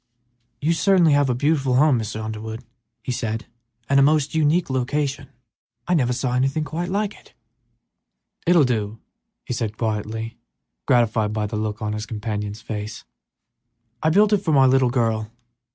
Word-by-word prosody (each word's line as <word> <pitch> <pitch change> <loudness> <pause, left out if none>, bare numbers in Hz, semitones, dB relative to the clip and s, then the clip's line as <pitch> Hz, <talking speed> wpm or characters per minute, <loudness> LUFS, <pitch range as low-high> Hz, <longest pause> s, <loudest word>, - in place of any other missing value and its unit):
"You 160 +3 +2
certainly 175 -3 +4
have 145 -1 +3
a 125 - +1
beautiful 135 -1 +1
home, 140 -2 +4
Mr. 110 0 -4
Underwood," 110 +2 -6 0.4
he 125 - -3
said, 115 -2 -3 0.4
"and 140 0 +4
a - - +6
most 150 +1 +3
unique 160 +2 +2
location. 135 +1 -1 0.6
I 180 - +2
never 130 -7 +2
saw 125 0 -1
anything 135 +4 +1
quite 165 +4 -4
like 205 +2 -1
it." - - -20 1.1
"It 175 - +5
will 165 - +6
do," 110 -4 -1 0.5
said 120 - -1
the - - -5
elder 110 - 0
man, 110 - -18 0.3
quietly, 110 +1 -6 0.5
gratified 110 -3 +2
by 105 -1 -1
what 105 - -6
he 105 -1 -2
saw 110 - -5
in 105 - -2
his 105 0 -5
companion's 105 -1 -4
face. 105 -1 -6 1.0
"I 155 - +3
built 205 +5 +4
it - - +6
for 175 -5 -1
my 135 -2 +6
little 130 -1 +4
girl. 115 -3 0
125 Hz, 175 wpm, -22 LUFS, 110-150 Hz, 1.1 s, a